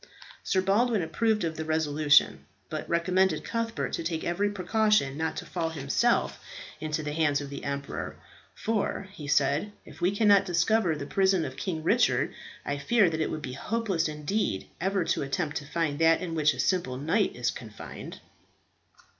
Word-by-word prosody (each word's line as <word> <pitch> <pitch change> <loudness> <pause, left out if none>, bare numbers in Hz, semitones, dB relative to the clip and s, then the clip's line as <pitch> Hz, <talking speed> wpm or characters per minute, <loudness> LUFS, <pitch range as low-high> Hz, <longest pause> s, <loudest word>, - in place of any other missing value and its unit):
Sir 190 - +1
Baldwin 215 +1 +2
approved 220 +4 +1
of 160 -1 -2
the 160 - -2
resolution; 155 -1 +3 0.2
but 155 - -4
recommended 180 0 +2
Cuthbert 230 0 -2
to - - -2
take 165 -1 -2
every 195 +4 0
precaution 205 -6 +1
not 160 +1 -2
to - - -5
fall 165 -2 -2
himself 160 - 0 0.4
into 155 0 -2
the 150 0 -3
hands 150 -2 +2
of 145 -1 -7
the 140 - -7
emperor; 140 0 -4 0.4
"for," 210 -2 -1
he 150 -7 -9
said, 145 +8 +2
"if - - -14
we 175 - +4
cannot 205 -1 +4
discover 175 0 +2
the 145 - -5
prison 190 0 +2
of 130 - -6
King 160 +2 -3
Richard, - - +2 0.3
I 145 0 -2
fear 200 +4 +3
that 160 0 -2
it - - 0
would 155 - -5
be 130 - -5
hopeless 200 - -1
indeed 150 - -2 0.2
ever 195 0 +1
to - - 0
attempt 145 +2 -2
to 145 - -6
find 160 -3 -1
that 165 0 +5
in 180 -3 -4
which 150 -2 +2
a - - -10
simple 170 -9 0
knight 165 - +1
is 120 -1 0
confined." 110 -4 -9
165 Hz, 175 wpm, -28 LUFS, 150-195 Hz, 0.4 s, that